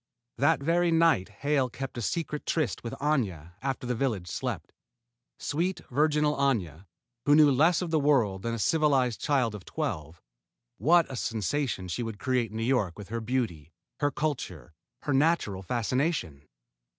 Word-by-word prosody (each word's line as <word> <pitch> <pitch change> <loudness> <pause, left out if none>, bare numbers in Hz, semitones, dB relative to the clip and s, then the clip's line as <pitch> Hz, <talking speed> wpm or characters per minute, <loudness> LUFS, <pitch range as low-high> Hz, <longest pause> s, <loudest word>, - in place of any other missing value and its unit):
That 145 +1 +3
very 170 +3 +2
night 165 - +3
Hale 135 +4 0
kept 135 +2 -6
a 120 - -4
secret 150 +4 -3
tryst 155 -6 -1
with 115 - -5
Aña 105 - -1
after 135 -2 -3
the 125 - 0
village 110 -8 -1
slept. - - -4 0.6
Sweet, 175 +5 -1
virginal 150 +2 +2
Aña, 100 - 0 0.4
who 145 - +7
knew 150 -2 +7
less 160 +7 +3
of 170 - -4
the 160 - +3
world 125 -10 +2
than 115 +2 -2
a - - -4
civilized 135 -3 +2
child 130 -7 +1
of 105 -3 -8
twelve 80 0 -4 0.6
what 170 +2 +5
a - - -4
sensation 115 -2 -2
she 90 +7 -3
would 115 -3 -4
create 125 -3 0
in 110 - -7
New 115 - -1
York 115 -8 +1
with 100 -2 -9
her 115 +1 -3
beauty, 110 - -2 0.3
her 145 - +2
culture, 120 - -4 0.3
her 145 - 0
natural 135 - +2
fascination! 115 - -1
130 Hz, 165 wpm, -28 LUFS, 105-150 Hz, 0.6 s, who